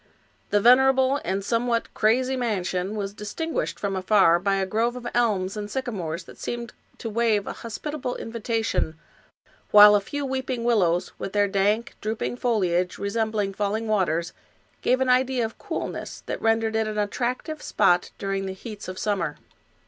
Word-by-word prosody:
The 205 - +3
venerable 265 +4 +5
and 195 +1 -2
somewhat 235 +1 0
crazy 250 +4 +2
man 225 -7 -1
sion 185 +3 -2
was 200 -1 -3
distinguished 220 +11 -3
from 200 -1 -2
afar 185 -3 +4
by 195 +2 +1
a 195 -1 0
grove 225 +5 0
of 250 -1 -8
elms 205 -5 +1
and 210 -1 -5
sycamores 190 -10 -3
that - - -15
seemed 235 0 -5 0.2
to - - -6
wave 220 -2 +1
a - - -4
hospitable 250 +3 -5
invitation, 225 -7 -2 0.7
while 210 0 +9
a 205 - +4
few 285 +7 -4
weeping 260 -2 -2
willows, 185 -7 +2
with 195 - -5
their 205 -1 +3
dank, 205 +3 +1
drooping 220 +3 -3
foliage, 185 -8 0
resembling 210 -1 -1
falling 210 +3 -1
waters, 170 -6 0 0.5
gave 255 +1 +2
an 260 - +2
idea 255 -1 +3
of 225 - -8
cool - - -3
ness - - -7
that - - -4
rendered 225 0 +1
it 220 0 +1
an 215 0 -4
attractive 250 +9 -2
spot 180 -4 +2
during 195 -1 -2
the 190 - -4
heats 210 +2 -9
of 185 0 -6
summer. 180 -8 -1
215 Hz, 165 wpm, -25 LUFS, 195-240 Hz, 0.7 s, while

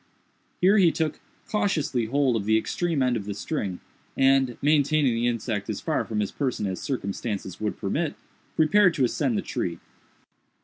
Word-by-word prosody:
Here 195 +4 +5
he 175 -4 +5
took 160 -2 -2 0.3
cautiously 155 - 0
hold 130 +1 +1
of 105 -3 -2
the 110 +1 +4
extreme 165 +4 0
end 125 -1 +2
of 105 -4 -3
the 100 -1 -4
string, 100 - -3 0.4
and, 135 -2 +3
maintaining 145 -2 +3
the 115 +1 0
insect 115 -3 -2
as - - -2
far - - -1
from 105 -1 -2
his 100 - -2
person 130 -7 -2
as 95 -2 -3
circumstances 100 -5 -4
would 105 - -2
permit, 145 +10 -2 0.4
prepared 175 +3 +4
to 140 - +1
ascend 125 -2 0
the - - -2
tree. 85 -1 -3
130 Hz, 170 wpm, -25 LUFS, 110-155 Hz, 0.4 s, Here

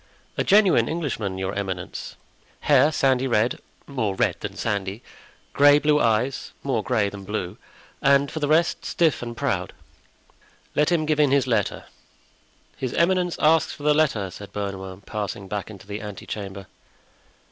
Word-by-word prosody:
"A - - 0
genuine 200 -2 +4
Englishman, 120 - -3
your 95 +1 -3
eminence. 95 -3 -5 0.5
Hair 150 - +5
sandy 135 -3 +2
red—more 120 -1 -2
red - - +1
than - - -6
sandy; 100 +2 -3 0.5
gray 145 0 +7
blue 150 0 +3
eyes—more 120 +2 0
gray 110 -3 +1
than 100 0 -7
blue; 95 -3 -4 0.4
and 140 0 +4
for 155 - -4
the 145 - 0
rest, 160 +3 +2
stiff 165 -4 +1
and 120 -1 -6
proud." - - -1 1.0
"Let 150 +3 +2
him 165 -3 +2
give 155 -1 0
in 150 -2 +5
his 140 0 +3
letter." 115 -6 -1 0.9
"His 130 -2 -3
eminence 180 0 +2
asks 160 +1 +3
for 145 - -11
the 150 0 +4
letter," 125 -11 +1
said 100 +2 -10
Bernouin, 95 -2 -5
passing 100 -1 -5
back 100 +1 -4
into 100 -3 -11
the 100 +1 -6
ante 105 -2 -8
chamber. 100 -2 -6
120 Hz, 150 wpm, -24 LUFS, 100-150 Hz, 1.0 s, gray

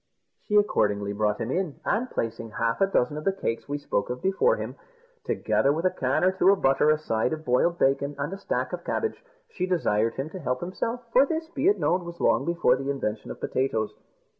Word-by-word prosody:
She 210 - 0
accordingly 105 - +2
brought 105 0 0
him 115 +2 -3
in, 180 -4 -2
and 240 +4 0
placing 115 0 -3
half 115 +3 0
a 195 - +5
dozen 150 -6 +1
of 155 - -5
the 195 - +2
cakes 140 -10 -4
we 145 - -1
spoke 100 -8 -2
of 125 +1 -3
before 195 - +2
him, - - -5 0.5
together 140 - +1
with 165 +4 -1
a 185 - +4
can 130 -5 0
or 185 - +5
two 190 0 +3
of 200 -1 +4
butter, 135 +1 +3
a 155 - +4
side 115 -4 -1
of 155 0 -6
boiled 150 +8 +2
bacon, 140 +1 +1
and 145 +5 -3
a - - -5
stack - - -2
of - - -4
cabbage, 445 - -2 0.3
she 185 -1 -2
desired 115 - +1
him 140 +4 -4
to 190 - -7
help 125 -5 -2
himself 230 +7 -3
for 265 +3 +6
this, 320 +1 -3
be 310 0 -1
it 405 - +4
known, 180 +1 +1
was 170 0 -9
long - - +2
before 170 -7 +3
the 135 +1 -4
invention 115 -6 -3
of - - -7
potatoes. 115 -5 -1
150 Hz, 225 wpm, -26 LUFS, 125-190 Hz, 0.5 s, for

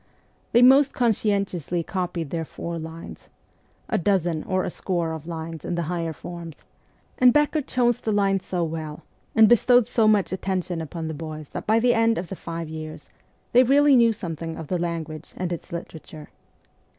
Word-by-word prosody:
They 240 +1 +5
most 270 +2 +6
conscientiously 200 - 0
copied 175 -4 -3
their 165 -1 -2
four 170 +1 -6
lines 160 +1 -9 0.6
a - - 0
dozen 175 -4 +1
or 185 -1 0
a - - -3
score 170 -3 -2
of 160 0 -8
lines 165 -1 -6
in 175 - -3
the 170 - -1
higher 165 0 -2
forms 170 0 -9 0.6
and 250 -1 +7
Becker 295 +3 +2
chose 245 -3 +1
the 220 - -1
lines 195 -2 +1
so 180 -2 -2
well, 155 -2 -5 0.3
and 220 -1 +7
bestowed 245 +1 +5
so 220 0 +2
much 210 -3 +3
attention 185 -2 -2
upon 160 +1 -5
the 160 - -4
boys 155 -1 -7
that - - -7
by 220 +1 +4
the 240 +1 +3
end 230 0 +2
of 175 0 -4
the 190 - -5
five 165 -1 -6
years 155 0 -8 0.4
they 245 - +7
really 280 +2 +5
knew 235 -2 +5
something 165 -5 -5
of 160 - -8
the 180 - 0
language 165 -2 -5
and 180 -1 -2
its 170 - -8
literature. 160 -2 -8
175 Hz, 180 wpm, -24 LUFS, 165-220 Hz, 0.6 s, and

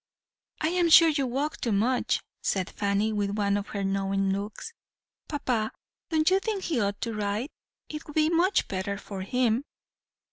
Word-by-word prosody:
"'I 315 - +2
am 350 -1 +2
sure 330 0 +9
you 285 -4 0
walk 280 +5 -2
too 235 - 0
much,' 235 +5 +1 0.2
said 190 -1 -1
Fanny, 205 +2 0
with 205 0 -1
one 200 -1 +2
of 205 0 -2
her 200 -2 -3
knowing 195 0 0
looks. 205 - -5 0.5
'Papa, 250 -7 -1 0.4
don't 315 +1 +3
you 380 - +5
think 400 -1 -3
he 310 -8 0
ought 200 0 -1
to 230 - -2
ride? 210 +6 -2 0.4
it 305 0 -7
would 295 - -10
be 310 0 +4
much 345 +4 +2
better 200 +1 -3
for 200 -1 -7
him.' 240 +4 +1
220 Hz, 175 wpm, -27 LUFS, 200-310 Hz, 0.5 s, sure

